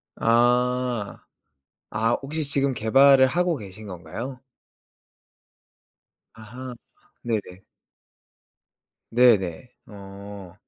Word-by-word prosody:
아. 125 Hz, -1 st, +1 dB, 0.7 s
아 110 Hz, +2 st, 0 dB
혹시 155 Hz, +3 st, -4 dB
지금 140 Hz, -1 st, +2 dB
개발을 130 Hz, +3 st, +5 dB
하고 175 Hz, +2 st, 0 dB
계신 105 Hz, -1 st, -10 dB
건가요? 100 Hz, +9 st, -7 dB, 1.9 s
아하. 125 Hz, +3 st, -9 dB, 0.5 s
네네. 100 Hz, -5 st, -4 dB, 1.5 s
네네. 115 Hz, -5 st, +3 dB, 0.2 s
어. 100 Hz, -2 st, -11 dB
115 Hz, 130 characters per minute, -24 LUFS, 100-130 Hz, 1.9 s, 개발을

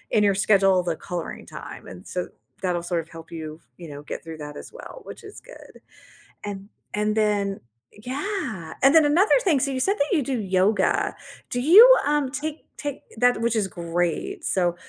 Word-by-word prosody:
in 210 Hz, -, +5 dB
your 195 Hz, -, +2 dB
schedule 195 Hz, -2 st, +4 dB
the 170 Hz, -2 st, -1 dB
coloring 175 Hz, -2 st, -5 dB
time, -, -, -10 dB
and 90 Hz, -, -10 dB
so, 180 Hz, -, -1 dB, 0.4 s
that’ll 180 Hz, -2 st, -1 dB
sort 170 Hz, -1 st, +1 dB
of -, -, -26 dB
help 165 Hz, 0 st, -10 dB
you, 160 Hz, -1 st, -5 dB, 0.3 s
you 170 Hz, -, -8 dB
know, 145 Hz, 0 st, -8 dB
get -, -, -3 dB
through 165 Hz, -1 st, -8 dB
that 145 Hz, 0 st, -8 dB
as -, -, -12 dB
well, -, -, -10 dB
which -, -, -9 dB
is -, -, -15 dB, 0.2 s
good. -, -, -14 dB, 0.7 s
And 200 Hz, -1 st, -4 dB, 0.4 s
and 210 Hz, 0 st, +1 dB
then 205 Hz, -1 st, +1 dB, 0.7 s
yeah! 280 Hz, -, -4 dB
And 275 Hz, +2 st, +6 dB
then, 315 Hz, -2 st, +7 dB
another 365 Hz, +11 st, +4 dB
thing 315 Hz, -7 st, +4 dB
so 275 Hz, -, 0 dB
you 260 Hz, -, -2 dB
said 395 Hz, +9 st, +1 dB
that 300 Hz, +7 st, +1 dB
you 300 Hz, -, +2 dB
do 260 Hz, -1 st, -2 dB
yoga? 190 Hz, +1 st, +1 dB, 0.4 s
Do 245 Hz, -, 0 dB
you, 360 Hz, -, +9 dB, 0.2 s
um, 295 Hz, -2 st, +1 dB
take 300 Hz, +2 st, -4 dB, 0.3 s
take 285 Hz, -2 st, -3 dB, 0.2 s
that 245 Hz, -2 st, +4 dB
which 235 Hz, 0 st, +1 dB
is 205 Hz, -3 st, +1 dB
great, 175 Hz, -, -2 dB
so 175 Hz, -2 st, +1 dB
215 Hz, 195 wpm, -24 LUFS, 175-290 Hz, 0.7 s, you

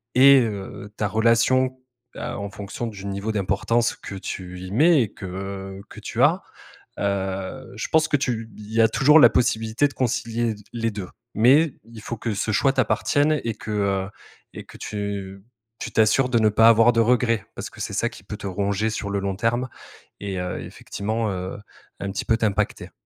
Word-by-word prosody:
et 135 Hz, +2 st, +8 dB
heu, 105 Hz, -1 st, -5 dB
ta 105 Hz, -, 0 dB
relation, 120 Hz, +4 st, +3 dB, 0.4 s
à -, -, -5 dB
en 100 Hz, 0 st, -4 dB
fonction 100 Hz, +4 st, -6 dB
du 100 Hz, -3 st, -8 dB
niveau 100 Hz, +3 st, -3 dB
d'importance 110 Hz, +4 st, +1 dB
que 100 Hz, -, -8 dB
tu 90 Hz, -2 st, -6 dB
y 95 Hz, +1 st, -7 dB
mets 150 Hz, +6 st, +5 dB
et 105 Hz, -, -6 dB
que 95 Hz, 0 st, -6 dB
que -, -, -11 dB
tu -, -, -3 dB
as, -, -, +4 dB, 0.6 s
heu, 95 Hz, +5 st, -3 dB
je -, -, -4 dB
pense 155 Hz, -1 st, +3 dB
que 150 Hz, -, +2 dB
tu 115 Hz, -5 st, -2 dB
il 105 Hz, 0 st, -11 dB
y 115 Hz, -, +1 dB
a 110 Hz, -, +6 dB
toujours 150 Hz, +4 st, +6 dB
la -, -, +9 dB
possibilité 120 Hz, +2 st, +1 dB
de -, -, -14 dB
concilier 120 Hz, -2 st, -1 dB
l 110 Hz, -, -5 dB, 0.2 s
les 115 Hz, -1 st, -1 dB
2. 100 Hz, -3 st, -6 dB, 0.3 s
Mais 135 Hz, +7 st, +5 dB
il 115 Hz, -1 st, -12 dB
faut 115 Hz, -, -5 dB
que 110 Hz, -1 st, -3 dB
ce 110 Hz, +2 st, -1 dB
choix 135 Hz, +7 st, +3 dB
t'appartienne 145 Hz, +2 st, +2 dB
et 115 Hz, -2 st, -2 dB
que, 110 Hz, -, -7 dB
heu, 100 Hz, -2 st, 0 dB, 0.4 s
et -, -, -9 dB
que -, -, -13 dB
tu -, -, -7 dB, 0.3 s
tu 95 Hz, 0 st, -9 dB, 0.4 s
tu -, -, -5 dB
t'assures 110 Hz, +4 st, +3 dB
de 120 Hz, -, +2 dB
ne 110 Hz, -1 st, +4 dB
pas 115 Hz, +2 st, +6 dB
avoir 115 Hz, +1 st, +6 dB
de 115 Hz, -, +1 dB
regret, 115 Hz, -2 st, +2 dB
parce -, -, -6 dB
que -, -, -10 dB
c'est -, -, -4 dB
ça -, -, +1 dB
qui -, -, -14 dB
peut -, -, -7 dB
te -, -, -9 dB
ronger 100 Hz, +3 st, -1 dB
sur 100 Hz, -2 st, -4 dB
le 100 Hz, -, 0 dB
long 95 Hz, -1 st, -2 dB
terme 120 Hz, +4 st, 0 dB, 0.5 s
et 100 Hz, -2 st, -4 dB
heu, 90 Hz, 0 st, -4 dB
effectivement, 110 Hz, +1 st, -3 dB
heu, 95 Hz, 0 st, -5 dB, 0.4 s
un 100 Hz, -1 st, -3 dB
petit 95 Hz, -, -3 dB
peu 115 Hz, -, +2 dB
t'impacter. 105 Hz, -5 st, -1 dB
110 Hz, 200 wpm, -23 LUFS, 100-120 Hz, 0.6 s, la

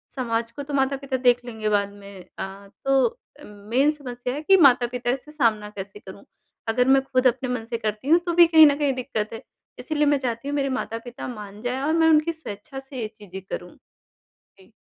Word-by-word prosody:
समाज 230 Hz, -3 st, -2 dB
को 285 Hz, +5 st, -7 dB
तो 285 Hz, +1 st, -8 dB
माता-पिता 270 Hz, 0 st, 0 dB
देख 245 Hz, -1 st, +3 dB
लेंगे 220 Hz, -3 st, -3 dB
बाद 200 Hz, -1 st, +1 dB
में 200 Hz, -2 st, -12 dB
अ, 195 Hz, +1 st, -7 dB, 0.2 s
तो 270 Hz, -1 st, +4 dB, 0.3 s
अ, -, -, -14 dB
मेन 225 Hz, +8 st, 0 dB
समस्या 250 Hz, -4 st, -6 dB
है 290 Hz, -, -4 dB
कि 385 Hz, +4 st, +6 dB
माता-पिता 250 Hz, -5 st, +3 dB
इस 255 Hz, 0 st, -1 dB
से 300 Hz, -, -13 dB
सामना 225 Hz, -8 st, +1 dB
कैसे 200 Hz, 0 st, -9 dB
करूँ? 190 Hz, 0 st, -12 dB, 0.4 s
अगर 250 Hz, +3 st, +2 dB
मैं 270 Hz, 0 st, +5 dB
ख़ुद 260 Hz, -1 st, +2 dB
अपने 255 Hz, +1 st, 0 dB
मन 250 Hz, -3 st, -3 dB
से 235 Hz, 0 st, -3 dB
करती 215 Hz, +2 st, -4 dB
हूँ 335 Hz, -, +6 dB
तो 345 Hz, -, -1 dB
भी 340 Hz, 0 st, +7 dB
कहीं 320 Hz, -1 st, +8 dB
न 285 Hz, -, +3 dB
कहीं 285 Hz, -2 st, +2 dB
दिक्कत 240 Hz, -4 st, -3 dB
है 225 Hz, -, -7 dB, 0.4 s
इसलिए 300 Hz, -2 st, 0 dB
मैं 290 Hz, 0 st, +3 dB
चाहती 245 Hz, 0 st, -3 dB
हूँ 290 Hz, -, -2 dB
मेरे 275 Hz, -1 st, 0 dB
माता-पिता 245 Hz, -2 st, -5 dB
मान 210 Hz, -3 st, -9 dB
जाएँ 250 Hz, +2 st, -2 dB
और 300 Hz, +3 st, 0 dB
मैं 325 Hz, 0 st, +4 dB
उनकी 310 Hz, +2 st, +3 dB
स्वेच्छा 270 Hz, -3 st, -8 dB
से 270 Hz, -2 st, -8 dB
ये 220 Hz, -, -2 dB
चीज़ें 190 Hz, -2 st, -9 dB
करूँ। -, -, -6 dB, 0.9 s
जी। 190 Hz, -, -20 dB
250 Hz, 215 wpm, -24 LUFS, 215-280 Hz, 0.9 s, कहीं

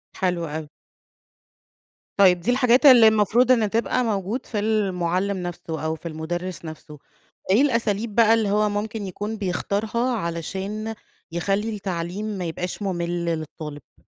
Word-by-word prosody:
حلو 180 Hz, -3 st, -1 dB
أوي. 155 Hz, 0 st, -5 dB, 1.5 s
طيب 185 Hz, -3 st, +6 dB
دي 230 Hz, +8 st, 0 dB
الحاجات 250 Hz, +1 st, +3 dB
اللي 245 Hz, -5 st, +9 dB
المفروض 220 Hz, +4 st, +4 dB
إن 225 Hz, -4 st, +3 dB
تبقى 230 Hz, +3 st, 0 dB
موجود 210 Hz, +2 st, -2 dB
في 210 Hz, -, -3 dB
المُعلِّم 195 Hz, -2 st, 0 dB
نَفْسه 170 Hz, -3 st, -5 dB
أو 160 Hz, 0 st, -1 dB
في 165 Hz, -, -8 dB
المُدرِّس 170 Hz, +3 st, -4 dB
نَفْسه. 155 Hz, -1 st, -10 dB, 0.5 s
إيه 215 Hz, -, +5 dB
الأساليب 230 Hz, -5 st, 0 dB
بقى 225 Hz, -1 st, +6 dB
اللي 220 Hz, -3 st, +2 dB
هو 210 Hz, +1 st, +2 dB
ممكن 205 Hz, 0 st, -3 dB
يكون 205 Hz, +4 st, -5 dB
بيختارها 215 Hz, +6 st, -1 dB
علشان 195 Hz, +5 st, -4 dB, 0.4 s
يخلّي 195 Hz, +5 st, -1 dB
التعليم 190 Hz, 0 st, -4 dB
ما 200 Hz, -5 st, -3 dB
يبقاش 180 Hz, +4 st, -4 dB
مُمِل 175 Hz, -3 st, -2 dB
للطالب؟ 155 Hz, -3 st, -5 dB
200 Hz, 135 wpm, -23 LUFS, 170-220 Hz, 1.5 s, اللي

